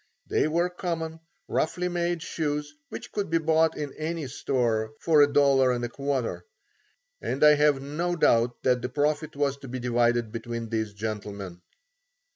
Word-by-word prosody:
They -, -, +1 dB
were 170 Hz, +3 st, +1 dB
common, 165 Hz, -3 st, -4 dB, 0.3 s
roughly 180 Hz, +3 st, 0 dB
made 175 Hz, -2 st, -1 dB
shoes 150 Hz, -2 st, -3 dB, 0.2 s
which -, -, -8 dB
could 205 Hz, -4 st, -2 dB
be 165 Hz, -, +3 dB
bought 160 Hz, 0 st, +2 dB
in 145 Hz, -2 st, -4 dB
any 160 Hz, 0 st, -3 dB
store 115 Hz, -4 st, -1 dB
for 160 Hz, -2 st, +3 dB
$1.25 135 Hz, -2 st, +1 dB, 0.8 s
and 135 Hz, -, -1 dB
I 150 Hz, 0 st, +9 dB
have 145 Hz, -2 st, +3 dB
no 170 Hz, +5 st, -2 dB
doubt 120 Hz, -6 st, +2 dB
that 125 Hz, -1 st, +2 dB
the 125 Hz, -, -3 dB
profit 150 Hz, +3 st, -1 dB
was 140 Hz, -1 st, 0 dB
to 140 Hz, -, -11 dB
be 130 Hz, +1 st, -4 dB
divided 120 Hz, -2 st, +1 dB
between 115 Hz, 0 st, -5 dB
these 110 Hz, -2 st, -2 dB
gentlemen. 100 Hz, -4 st, -5 dB
140 Hz, 145 wpm, -27 LUFS, 120-160 Hz, 0.8 s, I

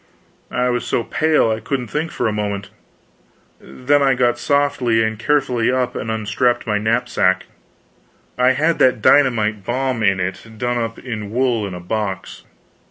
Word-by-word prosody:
I 125 Hz, 0 st, 0 dB
was 120 Hz, -1 st, -1 dB
so 115 Hz, -, -1 dB
pale 155 Hz, -3 st, +2 dB
I 110 Hz, -, -1 dB
couldn't 125 Hz, +1 st, -3 dB
think 155 Hz, +5 st, -2 dB
for 125 Hz, -, -2 dB
a -, -, 0 dB
moment; 100 Hz, -2 st, -3 dB, 0.9 s
then 145 Hz, +3 st, 0 dB
I 135 Hz, -2 st, +3 dB
got 120 Hz, -1 st, +1 dB
softly 130 Hz, -6 st, +1 dB
and 110 Hz, -1 st, -2 dB
carefully 125 Hz, -3 st, +1 dB
up 125 Hz, -1 st, -1 dB
and 110 Hz, -, -4 dB
unstrapped 110 Hz, +3 st, 0 dB
my 105 Hz, -2 st, 0 dB
knapsack. 110 Hz, -4 st, +1 dB, 0.9 s
I 125 Hz, +1 st, +3 dB
had 160 Hz, +5 st, +1 dB
that 125 Hz, -4 st, +3 dB
dynamite 110 Hz, -7 st, +3 dB
bomb 130 Hz, +2 st, -1 dB
in 100 Hz, -3 st, +2 dB
it, 95 Hz, +5 st, -5 dB
done 120 Hz, +2 st, -1 dB
up 115 Hz, -1 st, -3 dB
in 110 Hz, -5 st, -6 dB
wool 120 Hz, -2 st, 0 dB
in 95 Hz, -, -7 dB
a -, -, -7 dB
box. 95 Hz, +1 st, -4 dB
120 Hz, 165 wpm, -19 LUFS, 110-130 Hz, 0.9 s, I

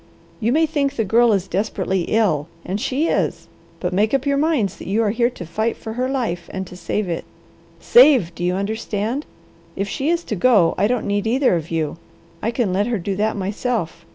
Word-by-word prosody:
You 230 Hz, 0 st, +1 dB
may 320 Hz, +4 st, +4 dB
think 285 Hz, -3 st, -1 dB
the 225 Hz, -, 0 dB
Girl 230 Hz, +4 st, +4 dB
is 195 Hz, -2 st, +1 dB
desperately 190 Hz, -2 st, -1 dB
ill, 190 Hz, -10 st, +1 dB, 0.2 s
and 195 Hz, +3 st, -3 dB
she 275 Hz, +5 st, 0 dB
is, -, -, -1 dB, 0.3 s
but 180 Hz, 0 st, -2 dB
make 215 Hz, +6 st, +2 dB
up 270 Hz, 0 st, -1 dB
your 280 Hz, 0 st, +2 dB
minds 280 Hz, -, +1 dB
that -, -, -10 dB
you 210 Hz, +4 st, +1 dB
are 210 Hz, -, +1 dB
here 235 Hz, +2 st, +2 dB
to 195 Hz, -8 st, -9 dB
fight 220 Hz, +8 st, -1 dB
for 220 Hz, -, -7 dB
her 250 Hz, +2 st, -1 dB
life, 225 Hz, -11 st, -2 dB
and 190 Hz, 0 st, -4 dB
to 180 Hz, -, -11 dB
save 200 Hz, +2 st, -2 dB
it. 170 Hz, -2 st, -3 dB, 0.6 s
Save, 270 Hz, -, +6 dB
do 175 Hz, -, -6 dB
you 180 Hz, +1 st, +1 dB
understand? 220 Hz, +5 st, -2 dB, 0.5 s
If 195 Hz, +1 st, -2 dB
she 275 Hz, +8 st, -2 dB
is 340 Hz, 0 st, +1 dB
to 215 Hz, -, -3 dB
go, 200 Hz, -5 st, +4 dB
I 200 Hz, -, +2 dB
don't 250 Hz, 0 st, -1 dB
need 205 Hz, +1 st, 0 dB
either 255 Hz, -3 st, +3 dB
of 165 Hz, -1 st, -4 dB
you. 160 Hz, -1 st, -2 dB, 0.4 s
I 225 Hz, -, 0 dB
can 230 Hz, -5 st, 0 dB
let 200 Hz, +3 st, +1 dB
her 240 Hz, -2 st, 0 dB
do 195 Hz, +1 st, -3 dB
that 215 Hz, +1 st, 0 dB
myself. 200 Hz, -3 st, -2 dB
215 Hz, 215 wpm, -21 LUFS, 185-250 Hz, 0.6 s, Save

